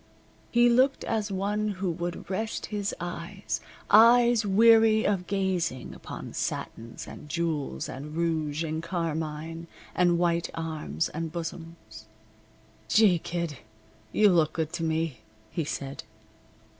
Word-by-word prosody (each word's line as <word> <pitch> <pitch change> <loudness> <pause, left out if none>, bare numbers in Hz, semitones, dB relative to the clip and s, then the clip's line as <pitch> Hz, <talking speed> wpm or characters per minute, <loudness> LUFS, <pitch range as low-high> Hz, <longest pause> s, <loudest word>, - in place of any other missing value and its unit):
He 240 0 +5
looked 255 +3 +3
as 215 -2 -1
one 205 +2 -1
who 185 -1 -1
would 175 +1 -5
rest 215 +4 -2
his 205 -1 -1
eyes 175 +3 -4 0.3
eyes 235 +2 +7
weary 220 +1 +6
of 190 -3 0
gazing 185 -10 -1
upon - - -8
satins, 115 +1 -4
and 150 - -10
jewels, 155 - -2
and 145 +4 -7
rouge, 160 -2 0
and 160 0 -2
carmine, 165 -1 -3 0.3
and 175 -1 +3
white 170 0 +1
arms, 155 - -2
and 165 0 -4
bosoms. 165 -10 -7 0.8
"Gee, 195 - +5
Kid! 170 -5 -4 0.5
You 210 - +5
look 160 -4 +3
good 160 -2 -2
to 165 - -2
me," 160 -3 -1 0.3
he 165 - -1
said. 140 -1 -5
170 Hz, 125 wpm, -28 LUFS, 160-200 Hz, 0.8 s, eyes